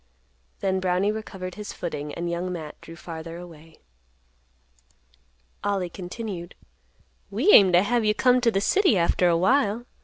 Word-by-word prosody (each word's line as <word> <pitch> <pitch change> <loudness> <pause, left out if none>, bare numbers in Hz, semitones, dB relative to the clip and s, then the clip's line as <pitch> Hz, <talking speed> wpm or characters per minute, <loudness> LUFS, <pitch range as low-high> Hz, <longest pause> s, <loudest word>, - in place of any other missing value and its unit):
Then 190 -1 0
Brownie 185 +2 +1
recovered 195 -4 -6
his 210 +1 -7
footing, 150 -4 -5
and 170 +1 -4
Young 170 +1 -3
Matt 160 -4 -7
drew 165 - -11
farther 165 0 -8
away. 165 -2 -13 1.8
Ollie 190 -4 -1
continued; 180 -1 -7 0.7
"We 240 - +2
aim 195 - +8
t' 175 - +5
have 230 +5 +2
you 210 0 +2
come 250 +1 +3
t' 240 - +3
th' 200 -3 0
city 380 - +3
after 175 +1 +2
a 170 - +3
while. 235 +3 +2
185 Hz, 150 wpm, -25 LUFS, 170-215 Hz, 1.8 s, aim